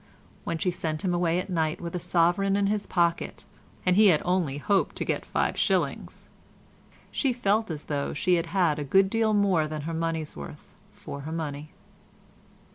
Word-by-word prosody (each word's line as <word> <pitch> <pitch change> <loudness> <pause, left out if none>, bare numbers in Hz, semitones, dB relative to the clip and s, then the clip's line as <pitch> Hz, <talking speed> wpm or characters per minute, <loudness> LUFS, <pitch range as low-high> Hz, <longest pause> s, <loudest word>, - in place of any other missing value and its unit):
When 165 - -2
she 180 +3 0
sent 160 -3 -3
him 185 -2 +1
away 175 -1 +1
at 180 - -2
night 160 -4 -1
with 170 0 -5
a - - -1
sovereign 175 +4 +2
in 200 0 +2
his 205 +1 -1
pocket 170 -2 0 0.4
(and 180 -1 +4
he 210 +1 +7
had 165 -6 +5
only 175 -6 0
hoped 195 +6 +1
to - - -3
get - - -2
five - - 0
shillings) - - -1 0.8
she 270 - +1
felt 220 -3 +1
as 155 -2 -5
though 145 -2 -2
she 180 +5 +1
had 170 -1 +1
had 165 -4 +1
a - - -2
good 190 +7 +3
deal 225 -2 +2
more 190 -6 +2
than 155 0 -5
her 165 +3 -4
money's 160 -1 -2
worth 70 - -10 0.2
for 140 - -8
her 155 +3 -6
money. 150 -2 -4
170 Hz, 190 wpm, -27 LUFS, 155-195 Hz, 0.8 s, he